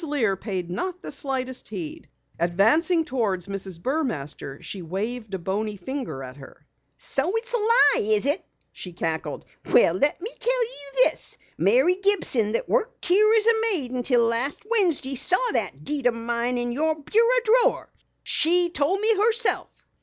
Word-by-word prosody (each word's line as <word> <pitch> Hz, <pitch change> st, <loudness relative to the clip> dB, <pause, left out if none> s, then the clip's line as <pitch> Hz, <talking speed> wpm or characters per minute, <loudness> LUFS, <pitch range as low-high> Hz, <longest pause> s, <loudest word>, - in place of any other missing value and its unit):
Lear 275 Hz, -10 st, 0 dB
paid 185 Hz, -3 st, -5 dB
not 365 Hz, -, -4 dB
the -, -, -6 dB
slightest 260 Hz, -2 st, -4 dB
heed. 180 Hz, -7 st, -7 dB, 0.3 s
Advancing 260 Hz, -, +2 dB
toward 215 Hz, -10 st, -2 dB
Mrs. 195 Hz, -2 st, -5 dB
Burmaster, 170 Hz, -, -4 dB
she 195 Hz, -, -7 dB
waved 215 Hz, +6 st, -5 dB
a -, -, -2 dB
bony 205 Hz, +4 st, -3 dB
finger 245 Hz, -, -6 dB
at 130 Hz, +1 st, -10 dB
her. 135 Hz, -, -15 dB, 0.3 s
"So 275 Hz, +6 st, -1 dB
it's 470 Hz, +2 st, -2 dB
a -, -, +3 dB
lie, 435 Hz, 0 st, +4 dB, 0.2 s
is 210 Hz, -, 0 dB
it?" 290 Hz, +6 st, +1 dB, 0.3 s
she 180 Hz, -, -9 dB
cackled. 165 Hz, -2 st, -4 dB, 0.3 s
"Well, 165 Hz, -, +5 dB
let 285 Hz, -, +1 dB
me 425 Hz, +7 st, -6 dB
tell -, -, +3 dB
you 455 Hz, -, +1 dB
this! -, -, -8 dB, 0.2 s
Mary 365 Hz, -7 st, +3 dB
Gibson 345 Hz, -, +2 dB
that -, -, -2 dB
worked -, -, -1 dB
out -, -, -4 dB
here 425 Hz, +4 st, +5 dB
as 430 Hz, -, +2 dB, 0.3 s
maid 280 Hz, -11 st, 0 dB
until 245 Hz, -1 st, +1 dB
last 235 Hz, -, -2 dB
Wednesday 350 Hz, -, +1 dB
saw 370 Hz, -, +2 dB
that 175 Hz, -, -3 dB
deed 285 Hz, -4 st, -1 dB
o' -, -, +3 dB
mine 235 Hz, +1 st, -2 dB
in 240 Hz, 0 st, -2 dB
your 315 Hz, +5 st, 0 dB
bureau 460 Hz, -, +2 dB, 0.2 s
drawer. -, -, 0 dB, 0.3 s
She 345 Hz, +2 st, +2 dB
told 335 Hz, +6 st, 0 dB
me 440 Hz, +1 st, +3 dB
herself!" 460 Hz, +2 st, +2 dB
265 Hz, 165 wpm, -24 LUFS, -, 0.3 s, Well